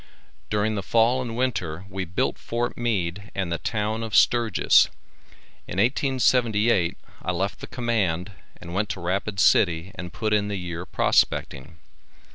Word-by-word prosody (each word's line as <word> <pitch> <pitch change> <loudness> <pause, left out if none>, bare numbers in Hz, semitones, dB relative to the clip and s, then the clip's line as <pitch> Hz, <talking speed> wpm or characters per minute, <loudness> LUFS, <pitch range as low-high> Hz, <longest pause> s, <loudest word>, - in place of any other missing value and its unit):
During 105 +1 +1
the 100 - -2
fall 115 +5 +2
and 120 -2 -5
winter 95 -9 -2
we 95 -1 -4
built 90 +1 -1
Fort 120 +1 -2
Meade 100 -4 -2
and 95 -3 -2
the 85 - -1
town 110 0 -2
of 115 -2 -3
Sturgis. 115 -5 +4 0.8
In - - -6
1878 115 -5 +2 0.2
I 90 - -2
left 95 +3 -2
the - - -8
command 105 -7 -1 0.3
and 85 - -9
went 105 +3 -1
to - - -4
Rapid 95 +3 -2
city 85 -1 +3
and 90 -1 -7
put 110 +4 -1
in 105 -1 +2
the 105 - -3
year 90 0 -5
prospecting. 70 -1 0
105 Hz, 150 wpm, -24 LUFS, 90-115 Hz, 0.8 s, Sturgis